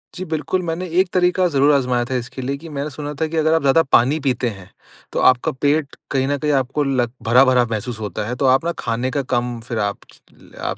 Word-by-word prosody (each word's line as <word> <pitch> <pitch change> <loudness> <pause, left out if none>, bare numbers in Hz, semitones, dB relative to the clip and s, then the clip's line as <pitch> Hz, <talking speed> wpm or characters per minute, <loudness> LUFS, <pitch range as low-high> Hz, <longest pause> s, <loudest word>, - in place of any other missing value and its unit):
जी 185 - -5
बिल्कुल, 160 +4 -1
मैंने 170 +1 -3
एक 185 -1 +2
तरीका 180 0 +3
ज़रूर 145 -2 +3
आज़माया 125 -3 +1
था 130 +1 -3
इसके 125 +1 -5
लिए 135 +2 -3
कि 165 +3 -11
मैंने 145 0 -4
सुना 145 +1 -6
था - - +3
कि 165 +1 -4
अगर 160 0 +3
आप 160 - +2
ज़्यादा 140 +4 +4
पानी 135 +6 +4
पीते 130 -4 -1
हैं 95 -4 -11 0.4
तो - - -1
आपका 125 -1 +1
पेट 145 +2 0 0.2
कहीं 135 -1 +1
न 145 +1 0
कहीं 150 +1 -1
आपको 135 +1 0
लग 130 -4 0
भरा-भरा 125 +2 +5
महसूस 110 +1 -4
होता 105 -3 -4
है 125 - -3
तो 135 - -1
आप 130 +4 +3
न 170 - +1
खाने 120 +3 -2
का 140 +1 -1
कम 120 -1 -1
फिर 115 -3 -3
आप 100 -1 -1 0.2
च - - -21
ले - - -19
आप - - -3
135 Hz, 245 wpm, -20 LUFS, 125-155 Hz, 0.4 s, भरा-भरा